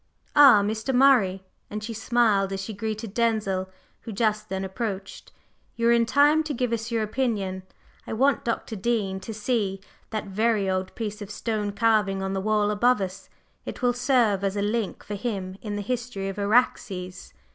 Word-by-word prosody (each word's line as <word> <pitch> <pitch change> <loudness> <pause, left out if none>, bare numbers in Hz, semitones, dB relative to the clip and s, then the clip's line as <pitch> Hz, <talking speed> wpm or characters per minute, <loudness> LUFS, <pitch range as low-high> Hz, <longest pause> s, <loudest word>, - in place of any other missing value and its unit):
Ah, 270 -8 +8
Mr. 220 +5 -1
Murray!" 235 -8 +4 0.3
and 210 0 -5
she 230 +2 -4
smiled 220 -3 +2
as 195 - -3
she 195 +3 -5
greeted 215 0 -4
Denzil, 215 -5 0 0.3
who 225 - -8
just 215 0 0
then 190 0 -3
approached. 195 -1 -5 0.4
"You 230 0 +2
are - - +6
in 235 -1 +3
time 290 +4 +4
to 295 -2 -3
give 245 -1 -1
us 225 0 -2
your 230 -2 0
opinion. 210 -5 -2 0.5
I - - -4
want 270 +5 +2
Dr. 230 -1 -3
Dean 200 -2 -1
to 190 - -7
see 210 -3 -1 0.3
that 215 -1 -3
very 210 0 +1
old 185 0 -2
piece 215 -2 -5
of 205 - -7
stone 210 -1 -2
carving 210 -3 +2
on 190 0 -2
the 195 - -1
wall 210 0 +1
above 240 +3 +3
us, 190 0 -5 0.3
it - - -8
will 245 0 +3
serve 240 -6 +2
as 195 +1 -1
a 200 - 0
link 215 0 -2
for 210 - -6
him 195 -3 -4
in 210 -2 -4
the 205 - -3
history 230 -4 -3
of 195 - -6
Araxes." 200 -4 0
215 Hz, 185 wpm, -25 LUFS, 195-235 Hz, 0.5 s, Ah